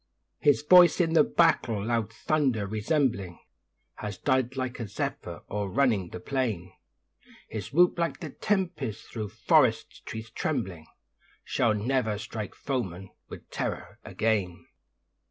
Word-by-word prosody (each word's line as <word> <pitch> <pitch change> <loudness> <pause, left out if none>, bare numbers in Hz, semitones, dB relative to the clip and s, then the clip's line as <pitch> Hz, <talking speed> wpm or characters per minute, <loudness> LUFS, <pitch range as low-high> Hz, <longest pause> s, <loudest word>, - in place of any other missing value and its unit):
His 145 0 +3
voice 180 +3 +7
in 165 -2 +2
the 160 -2 +6
battle, 120 -13 +2
loud 115 -2 0
thunder 130 -4 0
resembling, 110 - 0 0.6
Has 105 -2 -5
died 130 +3 +1
like 130 -1 -3
a 115 - -4
zephyr - - -5
o'errunning 105 -1 0
the 90 - -7
plain; 105 -7 -2 0.7
His 105 -4 -6
whoop 175 +3 +4
like 170 0 -1
the 160 -6 -6
tempest 170 - -2
thro' 110 -2 -4
forest - - +2
trees 110 -1 -7
trembling, 95 - -3 0.6
Shall 110 -2 +1
never 110 -1 0
strike 110 -1 -6
foemen 95 -9 -4 0.2
with - - -10
terror - - -4
again. 100 -6 -1
115 Hz, 125 wpm, -28 LUFS, 105-140 Hz, 0.7 s, voice